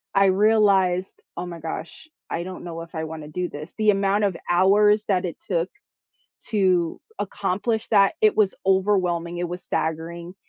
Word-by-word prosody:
I 195 0 +5
realized, 195 -2 +3 0.2
"Oh 175 - -3
my 170 -1 -7
gosh, 160 - -7 0.2
I 170 - -2
don't 185 +1 -8
know 165 -1 -6
if 165 0 -11
I 160 0 -2
want 160 -1 -7
to - - -9
do 180 +3 -3
this." 150 +3 -9
The 215 -1 +3
amount 200 +1 +1
of 195 -4 -1
hours 205 +4 +4
that 185 -2 +1
it 170 - -5
took 175 -1 0 0.8
to 185 -6 +1 0.2
accomplish 205 +3 -2
that, 200 +1 +4
it 430 -1 +4
was 205 -3 +3
overwhelming, 185 -3 +1
it 175 0 -2
was 180 +1 -6
staggering. 170 +2 -3
185 Hz, 170 wpm, -23 LUFS, 170-200 Hz, 0.8 s, I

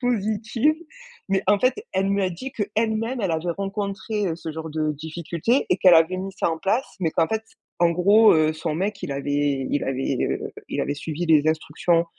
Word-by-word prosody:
positive. 230 +3 +1 0.6
Mais 195 - +2
en 205 +1 +4
fait, 255 +4 +2 0.2
elle 195 +1 +1
me 200 0 +1
a 185 - +1
dit 255 +11 -6
que, 210 - -2
elle-même, 225 +3 0
elle 195 -5 0
avait 165 +2 -1
rencontré, 200 +1 -3
heu, 165 - -2
ce 165 -1 -6
genre 160 +1 -6
de 155 0 -1
difficultés 170 - -1
et 180 - +4
qu'elle 180 -2 +7
avait 165 +3 +4
mis 195 +1 -5
ça 190 - -1
en 160 - -3
place, 220 +10 0
mais 165 -3 +1
qu'en 165 0 +2
fait, 220 0 -1 0.4
en 175 0 +4
gros, 200 +6 +6
heu, 155 -1 +3
son 155 0 -3
mec, 195 +4 -2
il 170 -6 -3
avait 140 -1 -1
il 145 - 0
avait, 135 0 -1
heu, - - -2 0.2
il - - -2
avait 145 - -2
suivi 160 +3 -4
les 155 -1 +4
instructions 165 +2 +1
180 Hz, 210 wpm, -23 LUFS, 160-210 Hz, 0.6 s, qu'elle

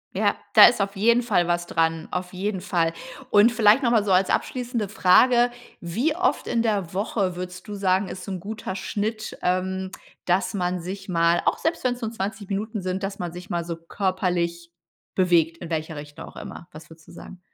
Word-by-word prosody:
Ja - - +2 0.2
da - - +10
ist 240 - +4
auf 200 0 -1
jeden 235 +5 +3
Fall 180 -7 +2
was 175 0 0
dranm 165 -1 0
auf 180 0 -4
jeden 190 0 -3
Fall. 170 -4 0 0.4
Und 210 +3 +6
vielleicht 220 +2 +5
noch 245 - +2
mal 225 -3 +4
so 200 - -1
als 185 +1 +4
abschließende 245 -4 -1
Frage: 240 +5 +4 0.3
Wie 235 - -1
oft 360 +1 0
in 235 -1 +1
der 200 -7 -1
Woche 195 -1 -1
würdest 180 +2 -7
du 210 - -6
sagen 190 -1 +1
ist 185 - -7
so 195 - -6
'n 185 - -4
guter 200 0 -6
Schnitt, 215 +3 -3
ähm, 190 +1 -1 0.4
dass 180 +2 +1
man 180 -2 -1
sich 195 +3 -7
mal 170 -1 +3
auch - - +2
selbst 325 +1 -2
wenn's 250 -1 -1
nur 225 -1 -3
20 205 -1 -5
Minuten 210 +2 -3
sind 185 +1 -2
dass 195 0 -3
man 175 -2 -4
sich 180 +2 -10
mal 170 -1 -2
so 170 -1 -4
körperlich 170 -1 -2 0.4
bewegt 170 -3 +3
in 170 -1 -8
welcher 160 0 -3
Richtung 145 0 -9
auch - - -14
immer? 170 - -9
Was 155 +1 -12
würdest 160 -1 -16
du - - -13
sagen? 190 - -11
190 Hz, 205 wpm, -24 LUFS, 175-215 Hz, 0.4 s, da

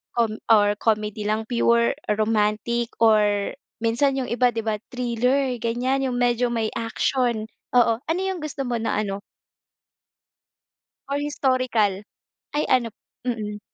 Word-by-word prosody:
com 230 -2 +1 0.2
or 205 -2 +5
comedy 215 -1 0
lang, 215 +1 -1
pure 235 0 +2 0.2
romantic 220 +2 +1
or 210 -3 +3 0.3
minsan 240 +5 +1
yung 255 - -2
iba 245 +1 +3
'di 225 0 -3
ba, 220 - +1 0.2
thriller, 250 +2 0
ganyan, 255 +4 0
yung 245 - -2
medyo 245 0 +2
may 225 -2 0
action, 230 0 0 0.2
oo, 240 -2 +5
ano 325 +3 -1
yung 380 -1 -2
gusto 285 -2 -4
mo 240 - -1
na 225 -2 -1
ano? 200 -1 -3 1.9
Or 280 - 0
historical. 255 -8 0 0.5
Ay, 295 - +1
ano 240 -3 +2 0.3
mm. 210 -4 -3
235 Hz, 130 wpm, -24 LUFS, 215-250 Hz, 1.9 s, or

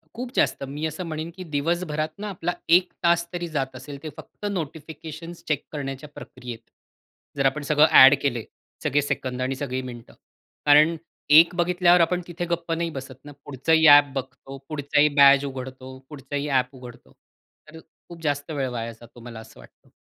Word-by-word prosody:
खूप 245 +1 -6
जास्त, - - +1
मी 145 +3 -5
असं 160 +4 -4
म्हणेन 155 +1 -5
की 185 - -7
दिवसभरात 155 0 -2
ना, 210 0 -5
आपला 175 -2 -3 0.2
1:00 185 0 -4
तास 170 0 +3
तरी 175 0 -3
जात 135 -4 -3
असेल, 140 +3 -9
ते 155 - -5
फक्त 180 +6 -11
नोटिफिकेशन्स 160 0 -7
चेक 150 -2 -1
करण्याच्या 140 -1 -6
प्रक्रियेत. 125 -2 -9 0.8
जर 135 - 0
आपण 140 +3 +1
सगळं 150 +1 +4
अ‍ॅड 135 +2 +8
केले, 120 -5 -1 0.4
सगळे 145 +2 +2
सेकंद 130 -2 -3
आणि 130 +1 -1
सगळी 130 -1 -4
मिनिटं, 120 -2 -10 0.5
कारण 150 +3 +6 0.4
एक 170 +2 +3
बघितल्यावर 175 0 +3
आपण 180 +2 +1
तिथे 175 0 -5
गप्प 170 -1 -3
नाही 165 0 -2
बसत 135 -2 -10
ना, 145 - -10
पुढचंही 160 +4 +2
ॲप 145 0 +9
बघतो, 135 +1 -7
पुढचाही 145 0 +2
बॅज 140 0 +7
उघडतो, 130 -1 -8
पुढचाही 145 0 -5
ॲप 130 0 0
उघडतो. 125 -1 -13 0.6
तर 160 - -11 0.3
खूप 170 -1 -11
जास्त 145 +1 -2
वेळ 135 -3 -2
वाया 115 -1 -5
जातो, 120 +1 -16
मला 115 -1 -9
असं 110 - -15
वाटतं. - - -19
145 Hz, 170 wpm, -24 LUFS, 130-165 Hz, 0.8 s, ॲप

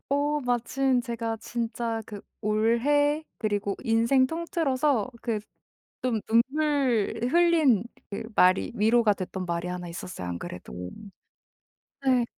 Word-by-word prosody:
어 290 +1 +1
마침 250 +1 +1
제가 230 -2 -3
진짜 230 -1 -3
그 205 -2 -8 0.2
올해 260 +8 +2
그리고 205 -2 -1
인생 230 +4 +3
통틀어서 295 - 0
그 225 -3 -1 0.6
좀 240 -4 0
눈물 260 -2 +2
흘린 325 - +4 0.3
그 200 - -4
말이 185 +1 +4
위로가 220 +1 +4
됐던 185 -1 -5
말이 170 0 -2
1 180 -1 -5
있었어요, 170 - -6
안 85 - -3
그래도. 90 +1 -7 1.2
네. 255 -2 +4
235 Hz, 215 characters per minute, -27 LUFS, 210-275 Hz, 1.2 s, 흘린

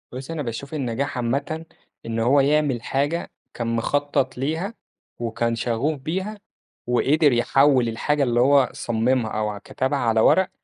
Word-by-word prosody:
بُصّي 130 +5 -6
أنا 160 - -3
باشوف 130 +4 -6
النجاح 140 -1 -2
عامةً 140 +7 -2 0.4
إن 115 0 -3
هو 125 +5 +4
يعمل 140 -3 +2
حاجة 145 +8 -1 0.2
كان 120 - -4
مخطط 135 +1 0
ليها، 160 - -2 0.5
وكان 115 0 -1
شغوف 125 +6 -1
بيها 190 +9 -3 0.5
وقدر 145 +5 +3
يحوّل 130 +1 +3
الحاجة 145 +6 0
اللي 120 -2 +1
هو 135 +1 +5
صممها 120 0 0
أو 105 0 -1
ع 105 - -5
كتبها 130 +7 -2
على 115 -3 +2
ورق، 190 +11 +4
135 Hz, 145 wpm, -23 LUFS, 120-145 Hz, 0.5 s, هو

